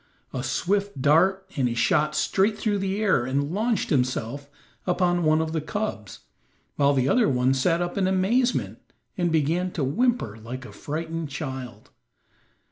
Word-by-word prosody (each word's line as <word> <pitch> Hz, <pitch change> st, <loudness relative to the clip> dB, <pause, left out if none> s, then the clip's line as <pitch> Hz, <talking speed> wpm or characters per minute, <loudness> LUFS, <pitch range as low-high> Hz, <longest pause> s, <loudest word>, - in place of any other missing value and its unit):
A 130 Hz, -, -2 dB
swift 200 Hz, +8 st, -1 dB
dart, 185 Hz, +7 st, +3 dB
and 130 Hz, -3 st, +1 dB
he 120 Hz, -, -2 dB
shot 150 Hz, +5 st, +2 dB
straight 195 Hz, +7 st, +1 dB
through 205 Hz, -2 st, 0 dB
the 195 Hz, +1 st, -2 dB
air 190 Hz, -, +3 dB
and 140 Hz, +4 st, -1 dB
launched 220 Hz, +1 st, 0 dB
himself 130 Hz, 0 st, -1 dB, 0.4 s
upon 175 Hz, -1 st, +2 dB
one 155 Hz, -1 st, +3 dB
of 160 Hz, 0 st, -2 dB
the 160 Hz, -1 st, -1 dB
cubs, 160 Hz, -, -4 dB, 0.5 s
while 140 Hz, 0 st, +3 dB
the 130 Hz, -1 st, +2 dB
other 235 Hz, -, +3 dB
one 130 Hz, 0 st, +2 dB
sat 165 Hz, +6 st, +1 dB
up 175 Hz, +3 st, -3 dB
in 190 Hz, -, +2 dB
amazement 215 Hz, +7 st, +1 dB, 0.4 s
and 175 Hz, -3 st, 0 dB
began 165 Hz, +4 st, +1 dB
to 155 Hz, -, -2 dB
whimper 145 Hz, -, 0 dB
like 125 Hz, +4 st, -7 dB
a -, -, -10 dB
frightened 160 Hz, +1 st, -4 dB
child. 130 Hz, -4 st, -7 dB
160 Hz, 160 wpm, -25 LUFS, 135-190 Hz, 0.5 s, dart